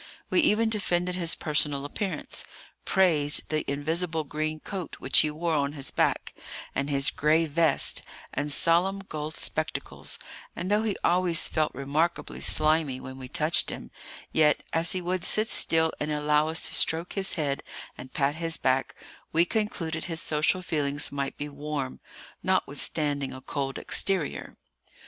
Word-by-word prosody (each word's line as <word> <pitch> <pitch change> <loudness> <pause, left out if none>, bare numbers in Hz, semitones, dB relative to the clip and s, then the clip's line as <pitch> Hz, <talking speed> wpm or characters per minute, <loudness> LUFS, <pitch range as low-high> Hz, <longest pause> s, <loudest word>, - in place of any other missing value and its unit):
We - - +4
even 225 -5 +3
defended 180 -4 0
his 170 -2 +1
personal 150 -2 +1
appearance, 190 +6 -3 0.4
praised 155 -7 +2
the 155 -1 0
invisible 160 +3 0
green 155 +2 -3
coat 185 0 -6
which - - +3
he 155 - +4
wore 165 +2 -2
on 140 -1 0
his 140 -3 -2
back, - - 0 0.4
and 140 +1 -1
his 140 +1 +3
gray 155 +2 +3
vest, 160 +2 +1 0.3
and 145 +2 -1
solemn 175 +6 +3
gold 155 0 -5
spectacles; - - -3 0.4
and 180 +3 -3
though 210 +1 +4
he 220 -2 -1
always 175 -2 +3
felt 155 -1 0
remarkably 150 +6 -1
slimy 155 -4 +1
when 130 0 -9
we 130 - -7
touched 155 +5 +3
him, - - -7 0.4
yet, 150 -1 +3
as 165 +1 +3
he 185 -1 -3
would 180 0 -1
sit 215 +3 +2
still 160 0 +3
and 150 +1 -2
allow 150 +1 +2
us 160 - +1
to - - -4
stroke 165 +2 +2
his 195 -1 0
head 145 -5 -1 0.3
and 130 - -10
pat 140 0 +2
his 165 -2 0
back, 130 +1 0 0.4
we 165 +2 +4
concluded 170 -6 -2
his 165 -2 -1
social 160 +4 +1
feelings 145 -3 0
might 140 -1 -3
be 145 - -4
warm, 145 -2 -4 0.4
notwithstanding 140 -3 0
a 130 - -8
cold 135 0 -3
exterior. 190 -7 -1
155 Hz, 155 wpm, -27 LUFS, 145-175 Hz, 0.4 s, We